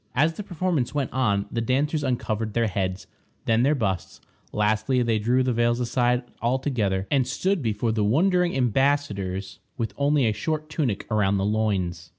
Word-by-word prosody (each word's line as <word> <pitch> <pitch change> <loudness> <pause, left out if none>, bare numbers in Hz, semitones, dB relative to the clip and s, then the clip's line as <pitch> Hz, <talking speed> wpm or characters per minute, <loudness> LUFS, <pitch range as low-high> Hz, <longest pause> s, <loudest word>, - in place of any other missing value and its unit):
As 155 +5 +3
the 210 - -6
performance 175 - -2
went 140 -3 -1
on, 100 -6 +1
the 115 - -1
dancers 145 +6 0
uncovered 110 -4 -2
their 115 -1 +2
heads, 95 -2 -2 0.4
then 115 0 +3
their 140 +4 +3
busts; 95 - -2 0.3
lastly, 110 +4 +1
they 115 -2 +1
threw 125 +4 +2
the 125 -1 0
veils 120 +1 +1
aside 125 0 +1 0.2
altogether, 120 -6 0
and 135 -3 +2
stood 185 +7 0
before 110 -1 -1
the 110 -1 0
wondering 175 - +2
embassadors 120 -7 0 0.2
with 115 -3 -3
only 140 -1 +2
a 110 - +2
short 155 +7 -3
tunic 130 -11 -1
around 100 -2 +2
the 95 - 0
loins. 95 -6 -1
120 Hz, 165 wpm, -25 LUFS, 105-140 Hz, 0.4 s, As